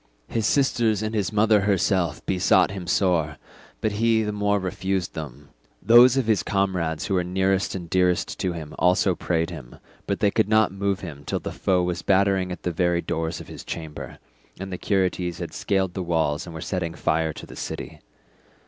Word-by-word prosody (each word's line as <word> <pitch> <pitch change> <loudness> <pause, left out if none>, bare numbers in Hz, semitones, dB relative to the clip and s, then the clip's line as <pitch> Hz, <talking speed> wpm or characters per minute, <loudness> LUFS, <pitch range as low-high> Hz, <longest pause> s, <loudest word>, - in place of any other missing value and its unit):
His 110 -3 -1
sisters 115 -6 +2
and 110 +1 -3
his 105 -4 0
mother 105 0 +4
herself 95 -4 +1
besought 95 -1 +3
him 95 -3 -6
sore, 85 -6 +1 0.4
but 110 - 0
he 110 +1 +2
the 105 - -2
more 105 0 +1
refused 95 -1 -2
them; 70 -2 -8 0.3
those 120 +3 +7
of 135 - +2
his 110 -2 +2
comrades 90 -6 -1
who - - -2
were 90 -1 +2
nearest 95 +2 0
and 90 -3 -6
dearest 90 0 +1
to 90 - -1
him 80 -3 -7
also 90 +2 +3
prayed 85 -1 -1
him, - - -9 0.3
but - - -1
they 100 - +3
could 100 - +1
not 110 -2 +4
move 100 0 -1
him 75 -6 -8
till - - -2
the - - -5
foe 90 -2 +1
was 90 0 -2
battering 95 -1 +2
at 90 - -7
the 90 - -1
very 85 0 +1
doors 80 0 -2
of - - -10
his - - -9
chamber, 80 -3 -7 0.4
and 95 0 -6
the 90 - -5
Curetes 90 -3 0
had 85 -1 -6
scaled 95 -3 0
the 95 - -3
walls 80 -3 0
and 85 - -8
were 80 - -6
setting 85 -2 -3
fire 80 -1 0
to - - -9
the - - -12
city. - - -6
95 Hz, 195 wpm, -24 LUFS, 85-100 Hz, 0.4 s, those